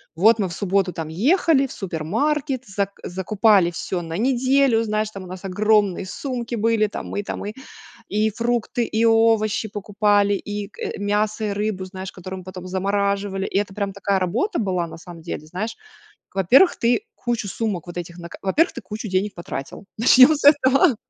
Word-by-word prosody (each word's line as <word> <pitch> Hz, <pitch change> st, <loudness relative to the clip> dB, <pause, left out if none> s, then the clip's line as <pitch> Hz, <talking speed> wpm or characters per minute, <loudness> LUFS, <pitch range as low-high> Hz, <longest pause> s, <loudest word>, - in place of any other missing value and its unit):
Вот 220 Hz, +7 st, +5 dB
мы 200 Hz, -, 0 dB
в 170 Hz, -, -7 dB
субботу 195 Hz, -1 st, 0 dB
там 160 Hz, -2 st, -5 dB
ехали 275 Hz, -, +3 dB
в -, -, -8 dB
супермаркет, 245 Hz, -, -2 dB
зак 200 Hz, 0 st, -3 dB
закупали 190 Hz, 0 st, +2 dB
всё 175 Hz, +1 st, -3 dB
на 165 Hz, 0 st, -6 dB
неделю. 255 Hz, 0 st, +3 dB
Знаешь, 215 Hz, -1 st, -1 dB
там 195 Hz, -3 st, -9 dB
у -, -, -10 dB
нас 185 Hz, +1 st, -9 dB
огромные 205 Hz, -1 st, +2 dB
сумки 240 Hz, +3 st, -5 dB
были. 225 Hz, -1 st, +2 dB
Там 210 Hz, -, -7 dB
мы 205 Hz, -, -3 dB
там -, -, -5 dB
мы 210 Hz, +1 st, -5 dB, 0.6 s
и 215 Hz, +2 st, +1 dB
фрукты, 235 Hz, +1 st, -1 dB
и 220 Hz, +1 st, 0 dB
овощи 225 Hz, -1 st, +3 dB
покупали 205 Hz, 0 st, +1 dB
и, 205 Hz, 0 st, -5 dB
э, -, -, -4 dB
мясо 210 Hz, +2 st, 0 dB
и 210 Hz, -, -1 dB
рыбу, 200 Hz, -2 st, -2 dB
знаешь, 190 Hz, 0 st, -7 dB
которые 185 Hz, +1 st, -8 dB
мы 185 Hz, -, -11 dB
потом 185 Hz, -1 st, -8 dB
замораживали. 200 Hz, +1 st, -1 dB
И -, -, 0 dB
это 200 Hz, -1 st, -2 dB
прям 200 Hz, -1 st, -2 dB
такая 200 Hz, 0 st, 0 dB
работа 230 Hz, -, -1 dB
была 185 Hz, -5 st, 0 dB
на 165 Hz, -, -10 dB
самом 170 Hz, 0 st, -11 dB
деле, 155 Hz, -2 st, -6 dB
знаешь. 190 Hz, +8 st, -4 dB, 0.6 s
Во-первых, 250 Hz, -, +5 dB
ты 240 Hz, -, +1 dB
кучу 240 Hz, -4 st, -2 dB
сумок 200 Hz, -6 st, -3 dB
вот 175 Hz, 0 st, -9 dB
этих 170 Hz, 0 st, -7 dB
на 170 Hz, -, -8 dB
ка -, -, -11 dB
во-первых, 300 Hz, -, +2 dB
ты -, -, -6 dB
кучу 210 Hz, +3 st, -6 dB
денег 190 Hz, +2 st, -1 dB
потратил, 170 Hz, 0 st, -7 dB
начнем 255 Hz, +5 st, +7 dB
с 290 Hz, -, -5 dB
этого. 280 Hz, -, +5 dB
205 Hz, 185 wpm, -22 LUFS, 185-230 Hz, 0.6 s, начнем